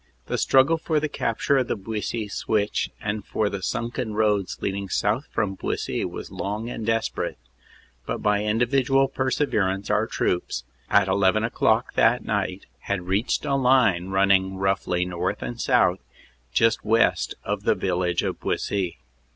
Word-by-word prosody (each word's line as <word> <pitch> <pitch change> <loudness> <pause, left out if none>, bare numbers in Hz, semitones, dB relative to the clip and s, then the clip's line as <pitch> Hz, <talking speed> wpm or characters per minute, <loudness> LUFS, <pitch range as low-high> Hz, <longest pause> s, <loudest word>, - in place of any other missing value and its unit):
The - - -2
struggle 140 +5 +4
for 160 -1 0
the 155 - -1
capture 135 0 0
of 125 - -1
the - - -1
Buissy 110 +2 -3
Switch 105 0 -1
and 105 0 -3
for 105 -2 -1
the 100 - -4
sunken 120 +2 -3
roads 105 -3 +1
leading 100 0 -3
south 110 +10 0
from 105 -3 -1
Buissy 95 - -3
was - - -7
long 105 +4 -4
and 115 - -5
desperate, 115 +1 -1 0.7
but - - -1
by 105 -1 +1
in 105 +1 0
dividual 135 +2 +3
perseverance 110 -8 0
our 110 +2 +2
troops, 90 - -1 0.3
at 100 -1 +4
eleven 95 +2 +2
o 115 - -1
clock 110 +3 +1
that 120 +2 +3
night, 100 -2 -2
had 100 -3 -3
reached 100 +6 0
a - - 0
line 125 -9 +3
running 95 0 +2
roughly 95 -2 0
north 90 +2 -3
and 120 0 -5
south 95 -8 +3 0.5
just 115 - +2
west 115 +2 +2
of - - -2
the - - +2
village 90 -1 0
of - - -3
Buissy. 90 -6 -2
105 Hz, 160 wpm, -24 LUFS, 95-120 Hz, 0.7 s, struggle